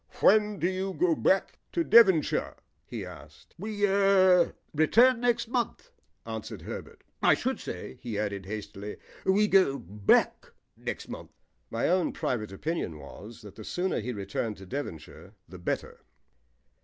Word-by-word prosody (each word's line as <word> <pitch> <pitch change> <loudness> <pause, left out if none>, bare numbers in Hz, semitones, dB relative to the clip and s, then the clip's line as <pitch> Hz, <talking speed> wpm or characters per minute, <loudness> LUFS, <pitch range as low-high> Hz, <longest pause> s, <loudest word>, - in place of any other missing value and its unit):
"When 210 -1 +4
do 175 - +1
you 190 +1 -2
go 355 -1 +3
back - - +1
to 340 - +1
Devonshire?" 195 - +5 0.3
he - - -5
asked. 75 +2 -13
"We 205 +1 -1
er 195 -2 +4 0.2
return 230 - +5
next 235 -1 +1
month," 240 -1 -2 0.3
answered 110 -1 -6
Herbert. - - -8 0.2
"I - - +5
should - - -2
say," - - -7
he 115 -4 -4
added 100 -2 -3
hastily, 105 0 -6 0.3
"we 205 +2 +4
go 190 -9 +4
back 100 +1 +1 0.2
next - - -5
month." - - -8 0.4
My 115 - -1
own 180 0 +2
private 110 -5 -2
opinion 100 - -3
was 105 +11 -11
that 105 -2 -11
the 110 - -10
sooner 180 - -1
he 120 +3 -4
returned 105 +1 -3
to 95 - -11
Devonshire 95 - -7
the 90 +2 -11
better. 85 - -3
150 Hz, 145 wpm, -28 LUFS, -, 0.4 s, Devonshire